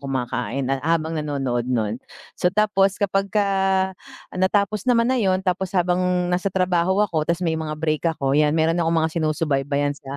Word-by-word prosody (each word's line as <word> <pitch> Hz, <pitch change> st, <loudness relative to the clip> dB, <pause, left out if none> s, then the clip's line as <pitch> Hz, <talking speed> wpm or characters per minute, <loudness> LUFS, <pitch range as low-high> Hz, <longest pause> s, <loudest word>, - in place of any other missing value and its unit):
kumakain 130 Hz, -2 st, -3 dB
at 135 Hz, -, -1 dB
habang 160 Hz, +1 st, 0 dB
nanonood 135 Hz, -6 st, -2 dB
no'n, 115 Hz, -2 st, -1 dB, 0.3 s
so 180 Hz, -, +1 dB
tapos 195 Hz, -1 st, +2 dB
kapag 195 Hz, 0 st, 0 dB
ka 205 Hz, -1 st, +1 dB, 0.8 s
natapos 200 Hz, +4 st, 0 dB
naman 240 Hz, +1 st, +3 dB
na 255 Hz, -, +1 dB
'yon 190 Hz, -1 st, +1 dB
tapos 185 Hz, +1 st, -1 dB
habang 180 Hz, 0 st, +2 dB, 0.3 s
nasa 180 Hz, +3 st, 0 dB
trabaho 185 Hz, +1 st, +1 dB
ako 160 Hz, -6 st, -2 dB
tapos 170 Hz, +2 st, 0 dB
may 165 Hz, -, +1 dB
mga 155 Hz, -1 st, -3 dB
break 155 Hz, +1 st, 0 dB
ako 135 Hz, -1 st, -1 dB
'yan 150 Hz, +2 st, +3 dB
meron 165 Hz, +2 st, +2 dB
akong 165 Hz, 0 st, +1 dB
mga 160 Hz, -, -2 dB
sinusubaybayan 145 Hz, -3 st, 0 dB
sa 140 Hz, -1 st, -9 dB
165 Hz, 170 wpm, -22 LUFS, 145-190 Hz, 0.8 s, naman